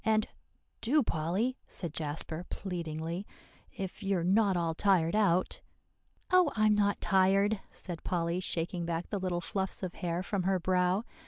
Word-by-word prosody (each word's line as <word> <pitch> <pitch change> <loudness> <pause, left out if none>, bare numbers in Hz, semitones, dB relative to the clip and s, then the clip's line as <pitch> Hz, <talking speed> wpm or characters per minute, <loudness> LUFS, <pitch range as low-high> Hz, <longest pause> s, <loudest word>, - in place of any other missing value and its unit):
And 215 0 +2 0.5
"do, 285 +5 +3
Polly" 195 +9 -1
said 170 -5 -5
Jasper 155 +2 -2
pleadingly, 170 0 -4 0.5
"if 195 0 -5
you 195 -1 +1
are 170 - -1
not 195 +1 +3
all 165 -1 0
tired 175 -1 +3
out." 185 -4 +2 0.7
"Oh, 365 -5 +5
I'm 215 -1 +4
not 205 -1 +2
tired!" 195 +2 +3
said 175 -3 -7
Polly, 170 0 0
shaking 175 -1 -2
back 170 0 -3
the 205 - -1
little 180 -2 -1
fluffs 190 +3 -3
of 180 - -3
hair 175 -1 -2
from 200 0 -1
her 190 +1 +2
brow. 180 +3 +2
185 Hz, 155 wpm, -31 LUFS, 170-205 Hz, 0.7 s, Oh